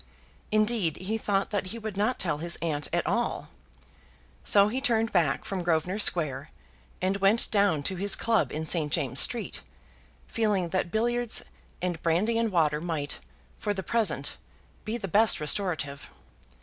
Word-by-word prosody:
Indeed, 215 -6 +2
he 190 +5 -3
thought 200 -1 0
that 205 -2 -1
he 225 - -5
would 215 -3 -6
not 215 +6 0
tell 170 -5 0
his 170 +2 +1
aunt 150 -3 0
at - - 0
all. - - -1 0.9
So 200 -1 +5
he 250 +5 -2
turned 230 -4 +1
back 165 -7 +1
from 195 -2 -3
Grosvenor 175 +3 0
Square, 155 -9 0 0.5
and 190 +1 +1
went 200 +4 +3
down 200 -8 +2
to 190 +5 -1
his 200 +2 +3
club 225 -1 +1
in 155 +1 -3
St. 155 -2 0
James's 140 -5 +1
Street, 240 - -2 0.6
feeling 205 -6 0
that 185 -1 -1
billiards 240 +3 +1 0.4
and 175 -3 -2
brandy 200 +8 +1
and 230 -2 0
water 155 -4 +2
might, 160 -4 -3 0.4
for 205 -1 -1
the 190 - -4
present, 180 -11 0 0.5
be 220 +2 -2
the 205 -4 -5
best 215 +4 +4
restorative. 150 -3 -1
190 Hz, 160 wpm, -27 LUFS, 160-215 Hz, 0.9 s, So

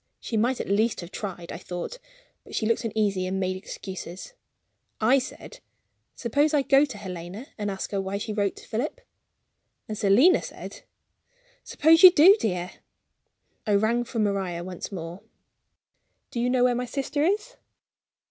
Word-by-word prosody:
She 230 - -5
might 240 +4 +1
at - - -4
least 215 +3 +1
have 175 +1 -10
tried, 180 -4 -6
I - - -6
thought; 180 - -6 0.4
but - - -10
she 220 - 0
looked 230 +2 +1
uneasy, 205 -4 0
and 190 +1 -2
made 185 -1 -1
excuses. 190 - -8 0.7
I 245 +5 +4
said: 380 - -9 0.6
"Suppose 290 +6 +1
I 285 - +3
go 275 +2 +5
to 260 -7 -9
Helena, 185 +3 -7
and 205 -1 -3
ask 195 -1 -5
her 200 -1 -1
why 195 +1 -3
she 215 +1 -4
wrote 200 -2 0
to - - -14
Philip?" 290 - -3 0.9
And 215 - -4
Selina 215 - +5
said: - - -9 0.8
"Suppose 325 +2 +4
you 370 - +12
do, 360 +3 +7
dear." 180 -3 -2 1.0
I 205 - +3
rang 225 +4 +2
for 240 0 -7
Maria 195 -5 -1
once 180 +2 -7
more: 175 -1 -7 1.1
"Do 240 - -3
you 245 +1 +1
know 250 -1 +2
where 250 0 +4
my 245 +1 -2
sister 280 +3 -2
is?" 420 +8 -1
215 Hz, 165 wpm, -26 LUFS, 190-260 Hz, 1.1 s, you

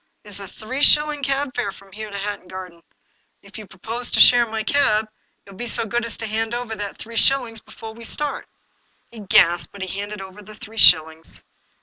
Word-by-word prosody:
It 210 - -14
is 200 -1 -8
a 195 - -8
three 235 +8 -6
shilling 300 0 +4
cab 275 0 -1
fare 240 -5 -2
from 195 0 -17
here 215 +2 -7
to 200 - -6
Hatton 200 -2 -5
Garden. 180 -2 -9 0.6
If 200 +2 -12
you 215 - -10
propose 225 +6 -6
to - - +1
share 240 -1 +7
my 220 0 -3
cab, 220 -5 +2 0.4
you 200 - -14
will 190 - -15
be 240 - -4
so 230 0 -1
good 235 +2 -2
as 230 - -5
to 225 - -5
hand 225 +2 -2
over 240 -2 -4
that 205 -2 -5
three 230 +1 -9
shillings 240 -2 +2
before 220 +1 -11
we 230 +1 -12
start." 290 +4 -3 0.6
He 230 - -11
gasped, 175 -4 +3
but 200 -1 -7
he 190 +1 -5
handed 205 0 -6
over 190 +1 -10
the 215 +1 -13
three 220 +1 -12
shillings. 160 -1 +4
215 Hz, 220 wpm, -21 LUFS, 195-240 Hz, 0.6 s, share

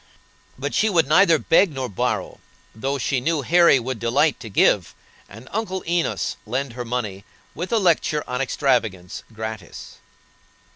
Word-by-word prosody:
But - - -4
she 220 - +2
would 165 -7 +2
neither 165 +2 +5
beg 165 +4 +3
nor 135 -2 -4
borrow, 100 - -3 0.3
though 135 +6 -2
she 130 0 -1
knew 155 +1 0
Harry 170 -1 +5
would 125 -1 -5
delight 140 +6 +1
to 115 - -9
give, 95 -2 +2 0.3
and 115 +6 -13
Uncle 195 -3 -3
Enos 170 -1 -1
lend 130 +2 -3
her 125 0 -5
money, 115 -5 -4 0.3
with 175 +4 -5
a 230 - +3
lecture 165 -6 +1
on 125 +1 -2
extravagance, 110 -9 -1
gratis. 110 -4 -8
130 Hz, 150 wpm, -22 LUFS, 115-165 Hz, 0.3 s, neither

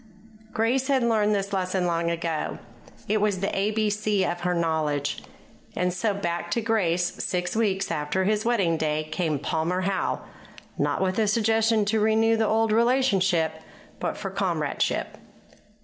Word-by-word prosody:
Grace 250 +4 +1
had 270 -3 +2
learned 215 -3 +2
this 200 0 -2
lesson 185 -1 0
long 170 -1 0
ago. 165 -2 -2 0.5
It 215 0 +1
was 205 -3 +1
the 195 - -1
ABC 210 0 0
of 175 - -3
her 180 0 0
knowledge. 155 -4 -1 0.5
And 180 0 0
so, 210 +4 0
back 175 -3 -3
to 235 - 0
Grace 180 -6 0
six 180 +1 -2
weeks 195 -4 0
after 155 +4 -1
his 210 +2 +1
wedding 195 -9 +1
day 155 -1 0
came 155 -3 0
Palmer 160 +6 -1
Howe, 190 0 -1 0.5
not - - 0
with 185 +2 0
a 215 - +2
suggestion 225 0 +2
to 220 +2 +1
renew 220 +1 +3
the 220 -1 +1
old 225 +1 +2
relationship, 195 - +2 0.4
but - - -2
for 195 -2 -5
comradeship. 175 -6 -1
195 Hz, 150 wpm, -25 LUFS, 170-220 Hz, 0.5 s, renew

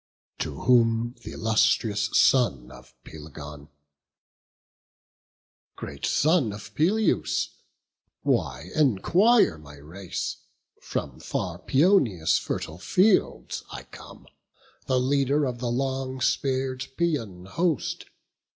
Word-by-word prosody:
To 75 -4 -4
whom 115 -1 +3
th' - - -13
illustrious 110 -1 +1
son 70 - +3
of 60 - -15
Pelegon: 75 -1 -10 2.1
"Great - - -5
son 155 -6 +2
of 105 0 -10
Peleus, 195 - +1 0.7
why 70 +7 -1
enquire 155 - +3
my 75 -1 -13
race? 85 +6 -6 0.4
From - - -5
far - - -4
Paeonia's 130 - +3
fertile 80 +2 -5
fields 185 - +1
I - - -7
come, - - -14 0.6
The 130 -1 +2
leader 140 +2 +1
of 125 -2 -4
the 120 -1 -2
long 130 +1 -2
spear'd 130 0 -1
Paeon 115 - -2
host. 165 - -1
120 Hz, 95 wpm, -26 LUFS, 90-140 Hz, 2.1 s, whom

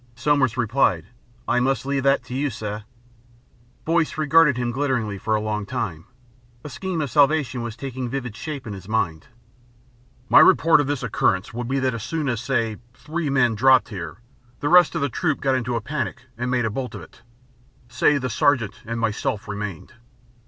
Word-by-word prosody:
Somers 130 -1 +1
replied, 115 -8 +1 0.4
"I 125 - +2
must 130 0 0
leave 140 0 0
that 135 -1 +2
to 125 - -9
you, 140 +3 0
sir." 105 -2 -6 1.0
Boyce 165 -1 +1
regarded 155 -2 +4
him 120 -1 -1
glitteringly 120 -6 -1
for 110 +2 0
a - - +1
long 105 -1 -2
time. 85 -9 -4 0.6
A 150 - -7
scheme 185 +1 -3
of 145 - -3
salvation 145 -3 +2
was 115 0 -6
taking 130 -2 -5
vivid 125 -4 -4
shape 140 0 -6
in 110 - -5
his 95 -1 -10
mind.... 90 -8 -1 1.0
"My - - +7
report 160 -1 +6
of 140 - -3
this 145 -3 -2
occurrence 105 -4 0
will 120 +1 -4
be 135 +3 -1
that 130 -2 0
as 115 - -5
soon 150 +4 -2
as, 120 -3 -2
say, 115 -5 -1 0.2
three 160 0 -4
men 125 -4 +3
dropped 130 +3 +4
here, 85 -8 -7 0.4
the 145 - -1
rest 175 0 +6
of 165 - -1
the 140 - +2
troop 155 +3 -1
got 135 -1 +1
into 125 -2 -1
a 115 - -1
panic 140 -1 -4
and 120 +2 -3
made 125 -2 +1
a 110 - -1
bolt 125 +3 -4
of - - -7
it. - - -16 0.7
Say 125 +4 +2
the 130 -2 -2
Sergeant 125 -6 +1
and 115 +1 -4
myself 110 -2 -2
remained. 105 -5 -6
125 Hz, 190 wpm, -23 LUFS, 110-140 Hz, 1.0 s, My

